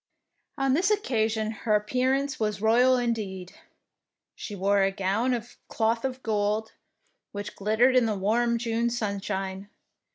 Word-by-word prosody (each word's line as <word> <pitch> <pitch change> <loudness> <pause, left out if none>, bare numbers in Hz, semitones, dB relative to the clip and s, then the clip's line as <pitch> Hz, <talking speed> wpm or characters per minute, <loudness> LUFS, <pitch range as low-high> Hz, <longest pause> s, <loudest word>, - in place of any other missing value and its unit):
On 270 -1 +1
this 360 +7 +2
occasion 220 - 0
her 215 -1 0
appearance 260 +7 0
was 210 -2 -1
royal 245 +4 +4
indeed. 210 -7 -3 0.8
She 210 - -7
wore 200 +1 +2
a 195 - +3
gown 195 +6 0
of 235 0 -8
cloth 230 0 0
of 260 -1 -4
gold, 215 0 0 0.6
which 205 0 -6
glittered 220 +6 +2
in 250 -2 +4
the 215 -2 -1
warm 235 +4 +1
June 230 0 0
sunshine. 195 -3 -3
220 Hz, 135 wpm, -27 LUFS, 205-245 Hz, 0.8 s, royal